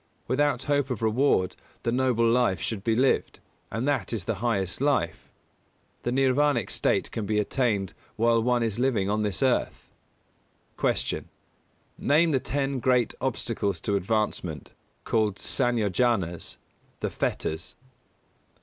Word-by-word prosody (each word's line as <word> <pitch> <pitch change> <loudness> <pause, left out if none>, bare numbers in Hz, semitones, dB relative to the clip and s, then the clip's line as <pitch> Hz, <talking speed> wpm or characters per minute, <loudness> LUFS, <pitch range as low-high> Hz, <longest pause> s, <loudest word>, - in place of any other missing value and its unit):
Without 145 +2 +1
hope 145 -2 +1
of 115 -3 -3
reward 110 -4 +2 0.3
the 115 - 0
Noble 125 -2 +2
Life 115 -6 +2
should 100 +3 -3
be 115 0 +2
lived, 130 +3 +1 0.3
and 115 +5 -2
that 145 -4 0
is 110 -5 -2
the 115 - 0
highest 100 -4 0
life. 130 - 0 0.7
The - - -2
nirvānic 135 +3 +2
state - - +1
can 105 -3 -4
be 105 0 +1
attained 105 -4 0 0.2
while 115 +1 +3
one 120 0 +2
is 115 -1 -1
living 115 -7 +1
on 105 +1 +1
this 105 +4 -1
earth. 130 -2 0 0.9
245. - - 0
Q. - - -16
_Name 160 +3 +4
the 135 - +2
ten 135 0 -1
great 125 -1 +2
obstacles 115 -7 -1
to 100 - 0
advancement, 100 -6 -2 0.3
called 110 -3 +1
Sanyojanas, 110 - 0 0.4
the - - -1
Fetters? 80 +2 -3
115 Hz, 135 wpm, -26 LUFS, 105-130 Hz, 0.9 s, Name